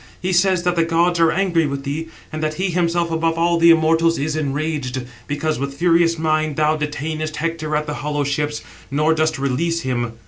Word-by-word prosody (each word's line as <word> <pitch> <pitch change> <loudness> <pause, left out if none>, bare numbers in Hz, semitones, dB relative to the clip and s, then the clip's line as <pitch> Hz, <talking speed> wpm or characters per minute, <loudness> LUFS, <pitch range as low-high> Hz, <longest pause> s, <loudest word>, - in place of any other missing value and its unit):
He 185 +1 -2
says 180 0 +3
that 180 0 +1
the 165 - +3
gods 170 +1 +1
are 165 -1 +4
angry 170 -3 +1
with 140 -1 -4
thee, 150 +4 -4 0.3
and 155 - -4
that 155 0 -1
he 185 +1 -1
himself 170 -1 0
above 165 0 0
all 170 0 +2
the 170 0 +6
immortals 165 0 +4
is 150 +2 -2
enraged, 140 -3 -2 0.2
because 145 -1 -2
with 140 0 -4
furious 170 0 +3
mind 155 -1 0
thou 155 +1 +2
detainest 155 +1 -3
Hector 155 0 -2
at 150 0 0
the 150 - -4
hollow 145 0 -1
ships, 145 +1 -2 0.3
nor 150 +3 +2
dost 160 0 0
release 160 +5 -1
him. 120 -4 -2
155 Hz, 200 wpm, -20 LUFS, 150-165 Hz, 0.3 s, the